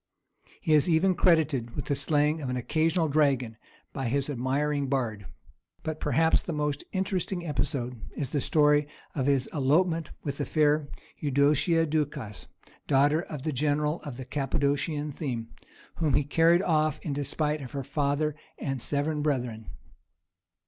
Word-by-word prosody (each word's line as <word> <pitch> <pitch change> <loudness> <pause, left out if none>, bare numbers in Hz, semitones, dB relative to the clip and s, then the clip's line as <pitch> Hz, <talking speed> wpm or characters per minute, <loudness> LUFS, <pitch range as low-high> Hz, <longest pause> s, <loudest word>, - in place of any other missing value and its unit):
He 160 -5 +2
is 150 +3 +4
even 175 +3 +4
credited 155 -10 +2
with - - -4
the - - 0
slaying 150 +2 +1
of 135 - -3
an 125 - -1
occasional 160 +6 +1
dragon 140 -6 +1 0.4
by 135 -3 -2
his 140 +4 0
admiring 140 +2 0
bard. 115 -7 -2 0.6
But 155 0 -4
perhaps 160 0 +3
the 170 - -4
most 150 -1 -1
interesting 190 -2 -2
episode 125 -6 -2 0.2
is 135 -4 -3
the 145 - 0
story 150 0 +3 0.3
of 135 -2 -1
his 135 -3 +3
elopement 160 +3 +2
with 140 0 -4
the 145 - 0
fair 150 -1 +2 0.3
Eudocia 150 +4 +3
Ducas, 145 -8 -3 0.4
daughter 145 +4 +3
of 150 -5 -7
the 155 -1 -1
general 150 +3 0
of 135 -5 -7
the 130 - -6
Cappadocian 145 +2 -1
theme, 125 -6 -4 0.5
whom 150 -5 +1
he - - +3
carried 165 +5 +4
off 155 -3 +2
in 150 - -2
despite 150 +2 -1
of 125 -3 -9
her 140 -1 -3
father 145 +2 0 0.2
and 135 -3 -3
seven 150 +3 -1
brethren. 125 -7 -2
145 Hz, 150 wpm, -28 LUFS, 135-155 Hz, 0.6 s, is